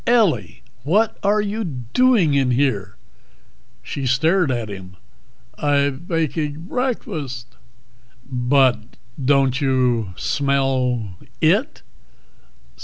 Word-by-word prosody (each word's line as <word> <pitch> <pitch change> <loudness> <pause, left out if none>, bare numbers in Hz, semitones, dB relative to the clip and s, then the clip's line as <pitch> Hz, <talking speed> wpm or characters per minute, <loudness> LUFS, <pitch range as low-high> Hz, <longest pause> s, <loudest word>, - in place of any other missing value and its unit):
"Ellie, 140 - +2 0.2
what 200 - +1
are 205 +1 +2
you 210 +2 -3
doing 165 - +2
in 135 -2 +2
here?" 120 -7 0 0.9
She 135 -2 -4
stared 160 +6 +2
at 120 -3 -2
him. 95 -2 -9 0.6
"I'b 145 0 +1
baking 155 -2 -2
breakfast." 160 - -4 0.7
"But 125 -3 +1 0.3
don't 135 -1 +2
you 125 -7 +1
smell 130 -7 0 0.2
it?" - - +1
135 Hz, 90 wpm, -21 LUFS, 125-165 Hz, 0.9 s, Ellie